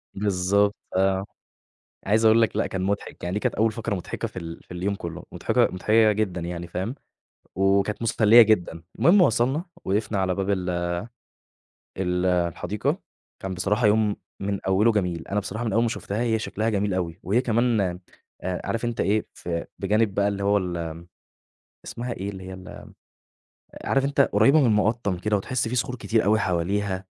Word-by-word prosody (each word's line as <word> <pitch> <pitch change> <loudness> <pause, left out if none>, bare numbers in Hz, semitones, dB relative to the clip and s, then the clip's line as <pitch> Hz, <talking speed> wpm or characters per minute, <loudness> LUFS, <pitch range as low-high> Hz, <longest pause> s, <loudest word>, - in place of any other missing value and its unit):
بالضبط 100 +1 +1 0.2
آه، 95 0 +2 0.8
عايز 110 +3 +2
أقول 110 +1 +6
لك 115 - +1
لأ - - +1
كان 95 - -4
مضحك 100 +2 -3
يعني 90 +1 -2
دي 105 - 0
كانت - - -1
أول 110 +1 +2
فقرة 110 -2 -3
مضحكة 90 - -4
في 90 - -8
ال 85 -1 -8
في - - -20
اليوم 100 +3 -2
كُلّه، 85 -1 -7
مضحكة - - +2
مضحكة 110 +4 +3
جدًا 100 -4 -1
يعني 85 0 -5
فاهم، 95 +9 -4 0.6
وكانت 100 +3 +1
مسلّية 115 0 +6
جدًا، 90 -6 +2 0.2
المهم 185 +3 +6
وصلنا 135 - +2 0.2
وقفنا 105 +1 0
على 95 -1 0
باب 95 0 -2
ال 95 -2 0 1.3
ال 90 -1 0
الحديقة، 85 -2 0 0.4
كان 95 -1 -4
بصراحة 105 +5 +1
يوم 105 0 +3 0.2
من 100 0 -2
أوله 105 +5 +4
جميل، 90 -5 -2
أنا 105 +1 0
بصراحة 105 +4 -5
من 110 - -1
أول 115 +2 +3
ما 120 - +2
شُفتها 110 -1 -4
هي 110 -2 +1
شكلها 110 +1 -2
جميل 100 -2 0
أوي، 85 -2 -3
وهي 105 +7 +2
كمان 120 -2 +1 0.6
آآ 90 0 -2
عارف 115 +1 -2
أنت 120 -1 -2
إيه 105 +2 +1
ف - - -11 0.3
بجانب 105 +1 +1
بقى 100 0 +2
اللي 100 -1 -3
هو 100 0 +3
ال 90 -2 -3
آمم، 80 -1 -5 0.8
اسمها 120 +1 -5
إيه 100 -2 -5
اللي 95 -1 -9
هي - - -7
ال 95 -1 -11 0.9
عارف 135 0 +1
أنت 140 0 +2
قريّبة 135 +6 +4
من 135 - +4
المقطّم 105 -2 +1
كده، 105 +4 0
وتحس 120 +4 -2
في 120 - -3
صخور 125 0 -1
كتير 115 -2 0
أوي 110 +2 +3
حواليها، 95 +1 -1
100 Hz, 180 wpm, -25 LUFS, 95-110 Hz, 1.3 s, أقول